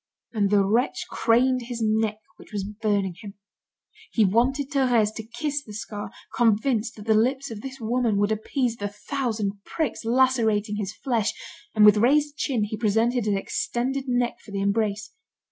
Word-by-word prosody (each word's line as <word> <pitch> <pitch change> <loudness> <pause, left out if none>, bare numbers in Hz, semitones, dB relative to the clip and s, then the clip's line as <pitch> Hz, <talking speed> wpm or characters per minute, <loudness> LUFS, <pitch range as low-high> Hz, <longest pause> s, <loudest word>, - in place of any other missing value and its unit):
And 205 -3 +1
the 200 -1 +4
wretch 230 +6 +1
craned 255 +1 +2
his 240 -2 -5
neck 220 -1 +1 0.2
which - - -16
was 205 -2 -2
burning 205 -3 -1
him. 205 -1 -9 0.8
He 220 - +3
wanted 260 +8 +1
Thérèse 245 -6 +2
to 220 - -6
kiss 295 -2 -1
the 210 - -11
scar, 210 0 -6 0.3
convinced 230 0 +2
that 210 - -11
the 220 - +3
lips 260 +5 +1
of 210 -2 -7
this 270 +2 -8
woman 230 -2 0
would 205 +1 +2
appease 230 +2 -1
the 205 - -3
thousand 210 -2 -3
pricks 315 -7 -3
lacerating 225 -4 +2
his 200 -2 -3
flesh, 235 -6 0 0.4
and 210 -1 +6
with 210 0 +8
raised 290 +6 +3
chin 260 -7 0
he 215 +1 -3
presented 225 +2 +1
his 205 -2 +1
extended 255 +6 -2
neck 245 -1 0
for - - -14
the 200 -1 -3
embrace. 210 +1 0
225 Hz, 170 wpm, -25 LUFS, 210-250 Hz, 0.8 s, with